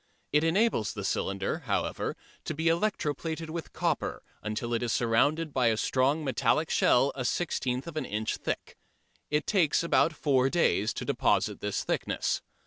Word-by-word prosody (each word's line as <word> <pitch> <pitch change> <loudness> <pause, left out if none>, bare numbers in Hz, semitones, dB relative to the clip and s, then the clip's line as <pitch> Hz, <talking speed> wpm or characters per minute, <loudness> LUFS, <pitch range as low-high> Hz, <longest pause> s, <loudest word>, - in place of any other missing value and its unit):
It 150 +1 +3
enables 165 - +2
the 105 -3 -5
cylinder, 95 - -1
however, 100 -3 -1 0.3
to 155 - -3
be 160 +2 +1
electro 170 -3 +1
plated 160 +1 -5
with 165 0 -5
copper - - -1 0.2
until 110 +2 -3
it 115 - 0
is 120 -2 -1
surrounded 145 +8 +2
by 125 -3 +3
a 110 -1 +2
strong 135 +7 +1
metallic 150 +3 +1
shell 135 +3 +4
a 130 - -4
sixteenth 130 -3 -1
of 170 -2 -8
an 155 - -2
inch 110 +1 -2
thick. - - -4 0.5
It 150 +1 0
takes 170 -6 +2
about 170 -1 +3
four 135 -3 +2
days 115 - +2
to - - -5
deposit - - +1
this - - -2
thickness. - - -1
145 Hz, 165 wpm, -29 LUFS, 115-160 Hz, 0.5 s, shell